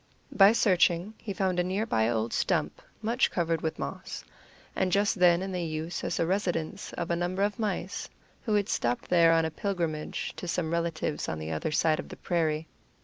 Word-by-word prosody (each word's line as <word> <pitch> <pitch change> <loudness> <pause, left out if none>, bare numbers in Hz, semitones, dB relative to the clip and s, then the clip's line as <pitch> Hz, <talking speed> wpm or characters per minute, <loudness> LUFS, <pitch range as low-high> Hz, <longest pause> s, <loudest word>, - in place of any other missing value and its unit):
By 195 +1 +7
searching 185 -3 +3
he 210 - -5
found 185 -2 0
nearby 185 - 0
an 120 - +1
old 110 0 -1
stump, - - 0 0.2
much 235 +4 +2
covered 165 -2 0
with 160 - -2
moss, - - -6 0.5
and 185 -1 +1
just 205 +2 +3
then 180 -1 +4
in 190 0 -4
use 165 -1 -3
as - - -1
the - - +2
residence 175 -3 -2
of 170 0 -3
a - - +2
number 180 +3 -1
of 205 +3 -1
mice, 200 -3 -3 0.3
who 215 -4 0
had 205 -1 +2
stopped 120 - -1
there 170 -2 +6
on 165 0 +3
a 160 - -2
pilgrimage 165 -5 -3
to 180 - -6
some 165 -1 -1
relatives 165 -3 -1
on 80 - -3
the 80 +1 -5
other 80 - -2
side 155 +1 +2
of - - -6
the - - -9
prairie. 160 -2 0
175 Hz, 195 wpm, -28 LUFS, 160-195 Hz, 0.5 s, By